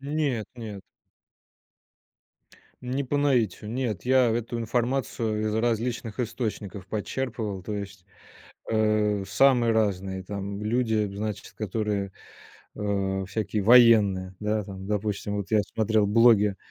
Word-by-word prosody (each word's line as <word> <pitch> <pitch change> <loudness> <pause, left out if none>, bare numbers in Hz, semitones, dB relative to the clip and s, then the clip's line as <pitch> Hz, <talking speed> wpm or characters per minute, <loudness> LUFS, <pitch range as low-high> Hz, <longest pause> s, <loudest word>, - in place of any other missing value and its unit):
Нет, 140 -6 -1
нет. 110 -5 -8 2.0
Не 130 +3 -2
по 140 +2 -2
наитию, 125 -8 +1
нет, 120 -7 -2
я 130 -2 +4
эту 120 +1 -2
информацию 115 -1 -1
из - - -2
различных 115 0 -1
источников 105 -5 -4
почерпывал. 110 -2 -3
То 105 +3 -5
есть, 100 -2 -7 0.6
э, 105 -2 +1
самые 120 +2 +4
разные 95 -3 0
там 100 +1 -5
люди, 110 -2 0
значит, 105 0 -5
которые, 105 -1 -2 0.6
э, 100 -2 -1
всякие 105 +1 -2
военные. 105 -5 +5
Да, 105 0 -1
там, 95 -1 -8
допустим, 105 0 -2
вот 100 -2 -4
я 110 -1 +4
смотрел 110 0 +1
блоги, 105 -2 +5
110 Hz, 115 wpm, -26 LUFS, 100-120 Hz, 2.0 s, военные